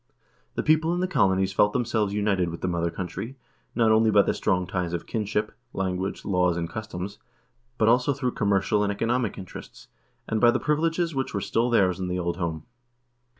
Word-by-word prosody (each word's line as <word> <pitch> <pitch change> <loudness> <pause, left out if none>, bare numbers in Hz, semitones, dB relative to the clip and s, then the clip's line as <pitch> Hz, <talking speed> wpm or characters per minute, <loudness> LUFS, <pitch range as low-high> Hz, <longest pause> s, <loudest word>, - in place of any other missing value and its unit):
The - - -1
people 160 +2 +3
in - - -2
the 185 - +1
colonies 95 - +2
felt 105 +1 +3
themselves 110 -4 0
united 100 -4 +1
with 85 - -7
the - - -1
mother 85 -1 0
country, 95 +9 -6 0.4
not 115 -2 +4
only 110 0 +4
by 105 -1 +5
the - - 0
strong 90 -3 0
ties 90 -1 -3
of 85 - -3
kinship, 105 -1 -2 0.2
language, 95 0 -3
laws, 90 -3 +2
and 85 -1 -2
customs, 100 -2 -6 0.6
but 110 - +2
also 125 +4 +4
through 130 -2 -1
commercial 100 0 +1
and 100 -1 +1
economic 115 +2 -1
interests, 95 -2 -10 0.4
and 110 - -1
by 120 - +7
the - - +2
privileges 165 +2 0
which 135 -5 -2
were - - +1
still 115 +5 0
theirs 95 -6 +3
in 95 - -2
the 90 0 -2
old 85 -1 -2
home. 85 -3 -3
105 Hz, 195 wpm, -26 LUFS, 90-120 Hz, 0.6 s, by